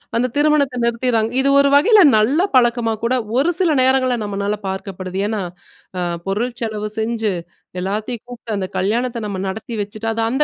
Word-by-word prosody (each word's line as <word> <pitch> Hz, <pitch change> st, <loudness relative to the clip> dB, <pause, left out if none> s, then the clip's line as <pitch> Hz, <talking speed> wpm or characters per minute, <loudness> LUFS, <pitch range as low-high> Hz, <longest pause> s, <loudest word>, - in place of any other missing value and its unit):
அந்த 240 Hz, +2 st, +2 dB
திருமணத்த 290 Hz, -3 st, +2 dB
நிறுத்திட்றாங்க. 235 Hz, -1 st, +1 dB
இது 275 Hz, +1 st, +2 dB
ஒரு 280 Hz, 0 st, +4 dB
வகையில 415 Hz, +9 st, +6 dB, 0.2 s
நல்ல 255 Hz, +10 st, +3 dB
பழக்கமா 240 Hz, -2 st, +3 dB
கூட 235 Hz, +2 st, +1 dB, 0.2 s
ஒரு 285 Hz, +6 st, +3 dB
சில 360 Hz, -4 st, +3 dB
நேரங்கள்ல 255 Hz, -1 st, +3 dB
நம்மளால 205 Hz, 0 st, -2 dB
பார்க்கப்படுது. 190 Hz, -1 st, -5 dB
ஏன்னா, 215 Hz, -1 st, -2 dB, 0.6 s
அ -, -, -1 dB, 0.3 s
பொருள் 230 Hz, +5 st, -1 dB
செலவு 215 Hz, -2 st, -3 dB
செஞ்சு, 220 Hz, -2 st, -1 dB, 0.5 s
எல்லாத்தையும் 210 Hz, +5 st, -3 dB
கூப்ட்டு 240 Hz, -2 st, -9 dB
அந்த 190 Hz, -1 st, -2 dB
கல்யாணத்த 235 Hz, +4 st, -1 dB
நம்ம 200 Hz, -2 st, -4 dB
நடத்தி 220 Hz, +4 st, -5 dB
வச்சுட்டு. 210 Hz, +2 st, -6 dB
அது 225 Hz, -, -2 dB
அந்த 265 Hz, +5 st, +2 dB
230 Hz, 160 wpm, -19 LUFS, 210-255 Hz, 0.6 s, வகையில